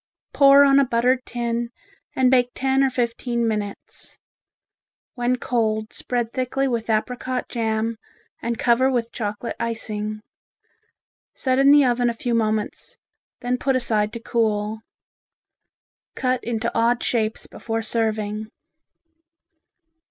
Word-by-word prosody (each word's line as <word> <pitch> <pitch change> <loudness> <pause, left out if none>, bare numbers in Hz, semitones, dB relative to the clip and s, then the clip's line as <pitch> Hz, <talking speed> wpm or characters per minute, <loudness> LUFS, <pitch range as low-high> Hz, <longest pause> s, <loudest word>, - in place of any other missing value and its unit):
Pour 280 0 +7
on 275 0 +5
a - - +5
buttered 250 +1 +1
tin 235 -1 -2 0.5
and 255 -1 +3
bake 250 -1 +4
ten 270 +1 +2
or 270 - +3
fifteen 235 -1 -1
minutes. 210 -2 -5 1.0
When 245 0 0
cold 220 -3 -1
spread 240 -2 -3
thickly 265 +1 -1
with 235 -3 -2
apricot 250 +3 -1
jam 225 -1 -1 0.4
and 235 0 -2
cover 250 +3 +3
with 235 -3 -1
chocolate 210 0 -4
icing. 215 -2 -3 1.1
Set 260 -1 0
in 275 +1 +6
the 290 -1 +7
oven 245 -1 +2
a 235 - -3
few 240 +1 -2
moments, 215 -2 -2 0.4
then 245 +1 -1
put 270 0 +1
aside 215 -4 0
to 235 - -5
cool. 220 -2 -1 1.3
Cut 255 -1 0
into 230 0 -2
odd 235 +1 +2
shapes 220 -2 -1
before 225 0 -4
serving. 215 -1 -2
235 Hz, 120 wpm, -23 LUFS, 220-255 Hz, 1.3 s, Pour